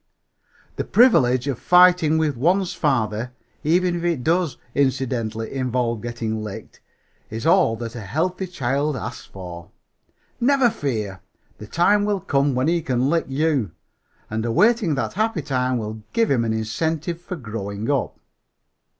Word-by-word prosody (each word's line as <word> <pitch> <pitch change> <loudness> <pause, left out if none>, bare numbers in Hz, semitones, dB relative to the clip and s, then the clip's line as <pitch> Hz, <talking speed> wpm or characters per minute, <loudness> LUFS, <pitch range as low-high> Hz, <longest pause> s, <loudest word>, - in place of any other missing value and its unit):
The - - -1
privilege 130 - +4
of 135 -5 -2
fighting 180 -3 +5
with 155 -3 +1
one's 180 +8 +1
father, 125 -7 -1 0.3
even 175 +3 +2
if 170 - -4
it 170 -7 0
does 170 -1 +1 0.2
incidentally 125 -5 -1
involve 125 -4 -1
getting 115 -2 -3
licked, 105 -2 -9 0.5
is 110 +1 -5
all 115 - +4
that 115 0 -6
a 120 - -6
healthy 170 - -2
child 140 -2 -1
asks 120 +1 -7
for. 90 -3 -9 0.7
Never 255 -1 +3
fear, 105 - -3 0.4
the 105 - -9
time 200 - +3
will 205 -1 0
come 140 -4 +1
when 130 +3 +1
he 170 0 +2
can 130 -1 0
lick 165 -1 +1
you; 135 - 0 0.5
and 110 0 -3
awaiting 195 - +3
that 115 -5 -2
happy 215 -5 -1
time 130 -2 0
will 110 -1 -5
give 230 -1 +2
him 125 -4 +2
an 110 - 0
incentive 160 +10 -2
for 180 +1 -6
growing 110 - -5
up. 140 -3 -1
135 Hz, 150 wpm, -22 LUFS, 115-170 Hz, 0.7 s, fighting